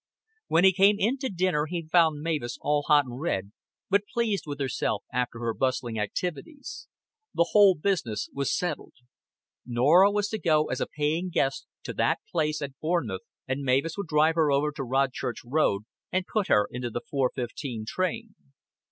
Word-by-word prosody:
When 165 - +3
he 190 0 +7
came 200 +3 +5
in 235 +7 +1
to 265 -1 -2
dinner 175 -5 0
he 170 -1 -4
found 160 -3 +3
Mavis 150 -8 -2
all 150 0 +1
hot 145 -2 +5
and 125 +2 -8
red, 100 - -2 0.4
but 200 +1 +1
pleased 230 -6 0
with 145 -1 -5
herself 130 -6 -1
after 125 -1 -1
her 115 -1 -1
bustling 120 -3 -1
activities. 180 - -5 0.5
The 170 0 +2
whole 200 -3 +7
business 150 - -1
was 140 0 -1
settled. 175 -5 -3 0.7
Norah 145 +11 +5
was 205 0 0
to 220 - -3
go 155 -3 +2
as 125 - -2
a - - 0
paying 155 +5 -1
guest 135 -5 -1 0.2
to - - -5
that - - +1
place 155 -2 0
at 140 -1 -7
Bournemouth, 155 - -1 0.3
and 130 +2 -2
Mavis 135 +5 +1
would 200 -3 -4
drive 155 +1 +3
her 160 -3 +2
over 145 +2 +2
to 150 0 -7
Rodchurch 130 -1 -1
Road 120 -7 +1 0.3
and 185 0 0
put 210 -1 -1
her 105 - +4
into 125 0 -4
the 120 +1 -4
four 135 -3 +1
fifteen 120 -2 -5
train. 210 - -2
150 Hz, 180 wpm, -27 LUFS, 130-180 Hz, 0.7 s, he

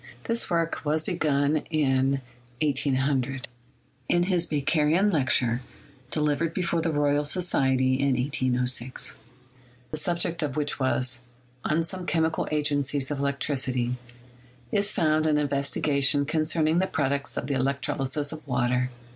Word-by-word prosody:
This 230 0 0
work 165 -2 0
was 155 +1 0
begun 150 -4 +1
in 135 -3 +1 0.4
1800. 135 -2 0 0.6
In 175 - +3
his 175 -2 +1
Bakerian 155 +6 +2
lecture 130 -4 +2 0.5
delivered 150 +2 0
before 170 -2 0
the 165 - 0
Royal 145 -1 +1
Society 130 -6 +2
in 140 -2 +2
i8c6, 125 -1 0 0.8
the 155 - -2
subject 170 +1 -1
of 150 -2 -2
which 145 -1 0
was, 130 -1 +1 0.4
"On 160 +2 +1
Some 180 +2 -5
Chemical 160 -1 0
Agencies 145 -2 0
of 145 - -2
Electricity," 130 -3 0 0.8
is 205 +1 +2
found 155 -3 +2
an 155 - +3
investiga 140 0 0
tion 140 +1 +4
concerning 155 +1 +1
the 190 - +1
products 140 -3 -1
of - - -2
the 140 - -2
electrolysis 135 +1 0
of 155 -1 -7
water. 125 0 +1
145 Hz, 130 wpm, -26 LUFS, 135-160 Hz, 0.8 s, tion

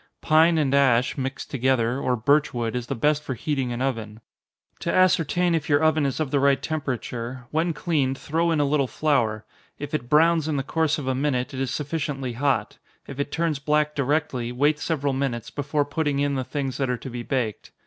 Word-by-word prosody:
Pine 160 +2 +4
and 140 -3 +1
ash, 130 -3 +3
mixed 135 0 -5
together, 130 -2 +1
or 125 -2 0
birch 140 +5 +2
wood, 115 -1 -2
is 125 -1 -3
the 135 - -2
best 150 +5 +2
for 135 -3 -4
heating 135 0 -2
an 120 +2 -2
oven. 110 -5 -3 0.6
To - - -2
ascertain 180 -1 +3
if 160 -2 -1
your 145 +1 +3
oven 155 -2 +3
is 135 - -3
of 150 -4 -2
the 145 - +2
right 140 0 +3
temperature, 125 -4 -4
when 160 +2 +1
cleaned, 145 -6 0
throw 165 +4 0
in 160 -2 +1
a 145 - +3
little 140 -1 +1
flour; 120 -8 0 0.3
if 145 +1 -7
it 120 -6 -2
browns 160 +1 +4
in 155 -2 -1
the 135 - -1
course 160 +2 0
of 145 - -5
a 130 - 0
minute, 130 -1 -1
it 130 - -5
is 135 -1 -1
sufficiently 145 -4 -3
hot; 125 -4 -1 0.3
if 140 0 -9
it 140 0 -2
turns 160 -3 0
black 150 +1 +1
directly, 140 -4 -1
wait 145 +4 +2
several 145 -4 -1
minutes, 130 -4 -2
before 145 +1 -1
putting 145 -1 -1
in 140 0 +1
the 130 -1 -1
things 135 0 -3
that 135 -2 -1
are 125 - 0
to 125 - -8
be 120 0 -5
baked. 120 -4 -3
140 Hz, 210 wpm, -24 LUFS, 130-150 Hz, 0.6 s, Pine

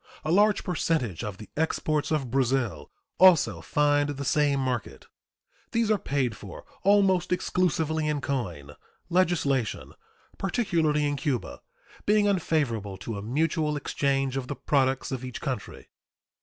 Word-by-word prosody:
A 155 - 0
large 210 +3 +4
percentage 155 - -1
of 105 -3 -5
the 105 - -12
exports 155 -1 0
of 140 -6 -1
Brazil 120 - 0 0.3
also 185 -4 +5
find 145 0 +2
the 140 -1 -4
same 145 0 +2
market. 125 -4 -3 0.7
These 230 -1 +2
are 210 - +2
paid 130 -5 -1
for 100 -3 -10 0.2
almost 190 -3 +3
exclusively 160 -4 0
in 150 -1 0
coin, 90 - -4 0.4
legislation, 160 - +1 0.5
particularly 170 -7 +1
in 145 0 -1
Cuba, 140 -5 -3 0.5
being 210 0 +4
unfavorable 140 - 0
to 105 +3 -6
a - - -6
mutual 150 - 0
exchange 135 -2 -1
of 130 -2 -4
the 145 - -4
products 135 -2 0
of 130 -1 -4
each 125 -1 -6
country. 130 -8 -5
145 Hz, 135 wpm, -27 LUFS, 125-165 Hz, 0.7 s, also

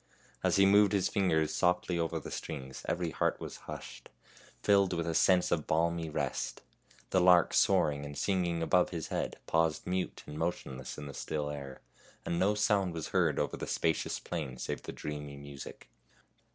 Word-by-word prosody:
As - - +3
he 95 - +6
moved 100 +1 +5
his 95 -2 +2
fingers 80 -7 +1
softly 90 -1 +1
over 85 0 -1
the - - -9
strings 65 0 -6
every 85 -2 -1
heart - - 0
was - - -7
hushed, - - -8 0.5
filled 100 -2 +4
with 85 -1 -1
a 85 - -1
sense 90 +2 +4
of 80 -3 0
balmy 85 0 +1
rest. 75 - -3 0.5
The 95 - +4
lark 90 -1 +6
soaring 75 -7 +3
and 70 -1 -7
singing 90 -4 0
above 90 +2 +3
his 85 -3 -5
head - - -2
paused 80 -1 +1
mute 90 0 -2
and 75 +1 -7
motionless 70 -6 -3
in 75 - -6
the 70 - -7
still 75 0 -3
air, 70 -2 -7 0.4
and 85 - -1
no 100 +3 +3
sound 100 -4 +2
was 80 - -4
heard - - +2
over - - 0
the - - -5
spacious 80 -2 0
plain 75 -7 -5
save - - -4
the - - -6
dreamy 75 -1 -6
music. 70 -1 -10
85 Hz, 180 wpm, -32 LUFS, 75-90 Hz, 0.5 s, he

